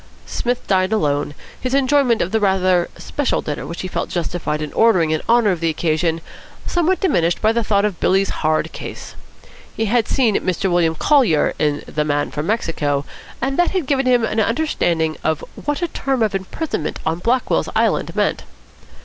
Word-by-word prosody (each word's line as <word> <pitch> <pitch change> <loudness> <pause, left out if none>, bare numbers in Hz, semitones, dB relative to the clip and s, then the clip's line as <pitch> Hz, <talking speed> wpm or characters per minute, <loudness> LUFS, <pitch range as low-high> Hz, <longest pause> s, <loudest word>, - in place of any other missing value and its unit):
Psmith 245 0 -2
dined 190 0 +1
alone, 145 -8 0 0.3
his 255 +1 -1
enjoyment 270 -3 +3
of 180 - -5
the 220 - +2
rather 185 -3 +2
special 290 -2 -1
dinner 150 - -4
which 170 - -6
he 185 - -4
felt - - -3
justified 170 -3 -2
in 150 -1 -5
ordering 185 -9 +3
in 155 - 0
honour 230 -3 +4
of 175 - -2
the 165 0 +1
occasion 160 +1 0 0.4
somewhat 350 +1 +1
diminished 175 - +1
by 220 - +3
the 235 0 0
thought 205 -1 +2
of 200 -5 -2
Billy's 195 +1 +2
hard 155 0 +1
case. - - -8 0.6
He 225 - 0
had 230 +1 +1
seen 235 -7 +2
Mr 185 +1 -1
William 170 -2 +2
Collier 235 - +3
in 150 -1 0
The 150 - -2
Man 145 -1 -1
from 150 +1 -4
Mexico, 150 -9 -1 0.4
and 270 +3 -1
that 350 - +4
had 350 - -1
given 270 -1 +1
him 245 -2 +4
an 225 0 0
understanding 175 - 0
of 160 -1 0
what 295 +3 -3
a - - +1
term 270 -6 -1
of 215 - 0
imprisonment 195 - -3
on 160 +1 -1
Blackwell's 245 +7 0
Island - - +1
meant. - - 0
195 Hz, 185 wpm, -19 LUFS, 160-245 Hz, 0.6 s, honour